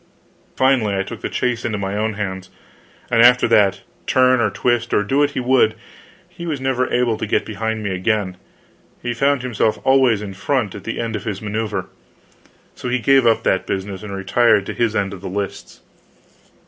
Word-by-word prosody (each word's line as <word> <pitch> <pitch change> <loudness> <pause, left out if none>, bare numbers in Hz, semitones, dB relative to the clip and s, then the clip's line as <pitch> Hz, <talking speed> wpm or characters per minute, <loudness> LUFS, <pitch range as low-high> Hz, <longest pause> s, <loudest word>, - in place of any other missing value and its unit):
Finally 125 -7 +2
I 95 - 0
took - - -9
the - - -3
chase 125 -2 -1
into 110 -3 -2
my 100 0 -3
own 110 +1 -1
hands; 95 -2 -5 0.6
and 115 -1 +4
after 125 +1 +6
that, 100 -4 +3 0.3
turn, 130 -1 +4
or 110 - +2
twist, 120 +3 0
or 105 - +3
do 135 +8 0
what 145 0 +3
he 145 - -4
would, 125 -4 +3 0.5
he 175 -1 -9
was 150 -4 -2
never 130 -1 -1
able 120 -3 +1
to - - -4
get - - 0
behind 110 +1 -3
me 100 - -2
again; 95 0 -1 0.7
he 120 0 -1
found 140 +2 +1
himself 110 -3 0
always 130 -6 +3
in 100 -2 -6
front 110 +1 -1
at 100 - -10
the 115 - -4
end 115 -1 -2
of 105 - -6
his 105 -3 -3
maneuver. 105 0 -3 0.9
So 125 - -6
he 125 - +1
gave 130 +1 +4
up 115 - +3
that 95 - 0
business 95 0 -4
and 105 -2 -8
retired 100 +1 +2
to - - -5
his 115 -2 0
end 100 -2 -1
of 95 - -9
the 95 - -6
lists. 100 +1 -5
110 Hz, 200 wpm, -20 LUFS, 100-125 Hz, 0.9 s, after